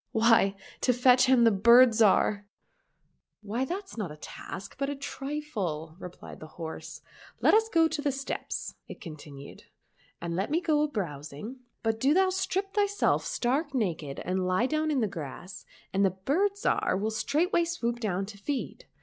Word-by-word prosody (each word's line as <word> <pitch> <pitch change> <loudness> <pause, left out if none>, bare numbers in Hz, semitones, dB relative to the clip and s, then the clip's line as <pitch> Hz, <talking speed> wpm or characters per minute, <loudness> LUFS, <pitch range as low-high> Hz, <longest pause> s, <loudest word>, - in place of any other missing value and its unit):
— - - -57
" - - -52
Why, 225 -4 +5 0.3
to 250 - +3
fetch 250 +1 +5
him 255 -2 +5
the 230 - +6
Bird 235 +5 +7
Zhar."— 205 -1 +3 0.5
" - - -45 0.3
Why 225 +5 -2
that's 380 +1 -6
not 185 -7 -3
a 150 - -10
task, 180 +5 -8
but 275 0 0
a 285 - -3
trifle," 270 - -4
replied 180 -2 -10
the 155 - -9
horse. 160 -2 -7 0.2
" - - -21
Let - - +6
us 445 +1 +4
go 330 -5 +4
to 315 -2 -3
the 290 -1 +1
steppes," 270 +1 -4
it - - -9
continued, 145 -3 -11 0.3
" - - -35
and 170 0 -4
let 190 +7 -1
me 315 +3 +2
go 315 -4 +1
a 300 - +2
browsing; 165 - -5 0.3
but 225 0 0
do 275 +6 +3
thou 380 0 +4
strip 380 +1 -2
thyself 405 -1 +2
stark 275 +4 -1
naked 165 - -2
and 185 0 -1
lie 185 +6 +2
down 310 +3 0
in 285 -4 +1
the 220 - +2
grass, 175 +2 -8 0.3
and 195 +1 +2
the 195 - +5
Bird 285 - 0
Zhar 405 - +1
will 215 +2 -1
straightway 335 - +1
swoop 240 -9 -2
down 195 -4 -1
to 200 0 -11
feed. 275 +6 -4
235 Hz, 190 wpm, -28 LUFS, 190-300 Hz, 0.5 s, Bird